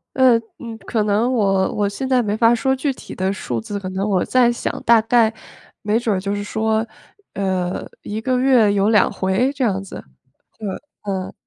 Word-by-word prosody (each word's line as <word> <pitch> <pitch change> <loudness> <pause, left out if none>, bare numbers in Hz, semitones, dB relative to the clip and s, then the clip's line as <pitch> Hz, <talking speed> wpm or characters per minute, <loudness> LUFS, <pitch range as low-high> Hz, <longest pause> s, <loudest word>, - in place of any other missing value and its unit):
呃， 255 -3 +5 0.2
嗯， 230 -2 -7
可 220 -2 0
能 215 +4 +1
我 195 -5 +1
我 205 -1 +1
现 260 +6 -4
在 255 -2 +3
没 210 -1 -1
法 230 +1 +4
说 265 +3 +1
具 270 +1 -1
体 - - -10
的 190 +1 -1
数 125 - -4
字， 200 - -5
可 185 - -6
能 195 +2 -2
我 190 -3 +1
在 250 -2 +3
想 240 - -4
大 235 -1 +6
概 225 -1 +3 0.5
没 215 +1 +1
准 225 -4 0
儿 - - -1
就 200 +1 -2
是 205 - -3
说， 220 +1 -1 0.5
呃， 185 -2 -2 0.2
1 215 +1 -4
个 255 +2 0
月 250 -5 +4
有 200 0 +2
2 210 -3 +4
回 195 +9 0
这 270 -3 -2
样 195 -3 0
子。 195 - -9 0.6
对， 210 -2 -5 0.3
嗯。 190 -2 -4
215 Hz, 205 characters per minute, -20 LUFS, 195-240 Hz, 0.6 s, 大